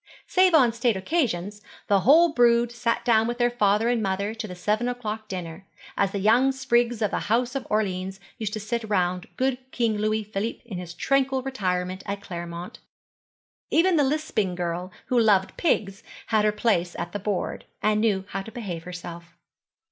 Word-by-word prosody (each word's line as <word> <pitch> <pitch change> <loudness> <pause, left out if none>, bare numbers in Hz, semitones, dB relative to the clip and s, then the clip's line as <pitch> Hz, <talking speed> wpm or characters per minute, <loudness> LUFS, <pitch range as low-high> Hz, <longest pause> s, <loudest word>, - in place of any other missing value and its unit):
Save 370 -2 +4
on 250 -7 +5
state 235 -2 +1
occasions, 205 - -1 0.2
the 200 -1 +3
whole 320 - +6
brood 240 -2 +4
sat 235 -1 -1
down 225 -2 +4
with 240 0 -3
their 240 0 +2
father 210 -1 +2
and 240 -1 +1
mother 200 +1 -1
to 225 -1 -5
the 180 - -8
seven 210 +6 0
o'clock 220 -3 -5
dinner; 180 -1 -7 0.3
as 200 - +2
the 200 - -3
young 230 +7 +4
sprigs 240 -3 +1
of 210 - +1
the - - 0
House 240 +3 +2
of 275 -2 -4
Orleans 190 -2 -1 0.2
used 215 -2 -3
to 215 - -3
sit 235 +3 -3
round 180 -3 0
good 260 -1 +1
King 230 -4 0
Louis 215 +1 0
Philippe 210 +2 -4
in 200 -7 -6
his 175 -1 -8
tranquil 270 +3 +1
retirement 185 -7 -2
at 200 0 -3
Claremont. 175 +3 -7 0.9
Even 355 +2 +3
the 295 - +4
lisping 265 - 0
girl 175 +1 -3
who 250 - +2
loved 205 -4 +3
pigs 205 - 0 0.3
had 215 -1 +3
her 210 - +4
place 205 -5 0
at 170 - -4
the 205 - -4
board, 200 -1 -3 0.2
and 215 0 +2
knew 200 -4 +1
how 195 - -3
to 225 - -10
behave 185 -9 -6
herself. 175 -1 -9
215 Hz, 185 wpm, -25 LUFS, 190-240 Hz, 0.9 s, whole